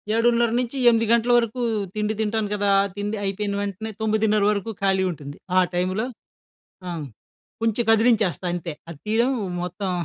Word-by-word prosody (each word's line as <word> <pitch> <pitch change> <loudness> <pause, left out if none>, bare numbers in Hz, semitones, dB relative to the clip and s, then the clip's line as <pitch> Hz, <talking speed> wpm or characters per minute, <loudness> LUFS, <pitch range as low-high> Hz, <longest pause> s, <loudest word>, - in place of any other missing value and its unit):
7:30 235 0 +3
నుంచి 250 +2 -3
8 230 -1 +3
గంటల 235 +1 +3
వరకు 235 +1 0 0.3
తిండి 210 0 0
తింటాను 220 -1 0
కదా! 205 -1 +1 0.3
తిండి 205 +1 -3
అయిపోయిన 200 +1 -2
వెంటనే 205 +2 -4
9:30 215 -1 +2
వరకు 210 +2 -2
ఖాళీ 190 -1 +2
ఉంటుంది. 145 -3 -9 0.2
ఆ! - - +5 0.2
టైమ్‌లో 185 +5 0 0.8
ఆ! - - -3 0.7
కొంచెం 225 +1 +1
కదిలించేస్తా 220 -5 +3
అంతే, 170 -2 -4 0.2
అది 160 -4 -9
తీయడం 230 +4 +2 0.3
మొత్తం 180 +2 -3
210 Hz, 145 wpm, -23 LUFS, 195-225 Hz, 0.8 s, ఆ